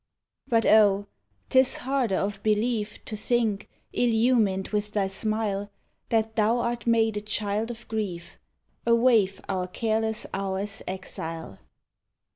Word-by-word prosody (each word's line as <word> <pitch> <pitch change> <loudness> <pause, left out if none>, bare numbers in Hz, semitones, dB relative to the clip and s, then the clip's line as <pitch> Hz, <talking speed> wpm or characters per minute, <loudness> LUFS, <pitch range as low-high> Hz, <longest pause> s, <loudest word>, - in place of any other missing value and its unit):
But 230 -1 +2
oh! 205 -2 +5 0.5
'tis 260 -1 +4
harder 255 -6 0
of 195 +1 -2
belief 215 0 0
To 215 - -5
think, 215 -2 0 0.2
illumined 225 -5 +2
with 210 0 -2
thy 205 -2 +1
smile, 205 0 -1 0.4
That 225 -1 +1
thou 220 +2 +3
art 235 0 -2
made 225 -2 +3
a - - -2
child 210 +1 -1
of 235 0 -8
grief, 200 -6 -4 0.5
A 235 - +6
waif 230 -5 +3
our 185 -2 -1
careless 220 +2 -1
hours 195 +1 -3
exile. 165 - -5
215 Hz, 125 wpm, -26 LUFS, 195-230 Hz, 0.5 s, A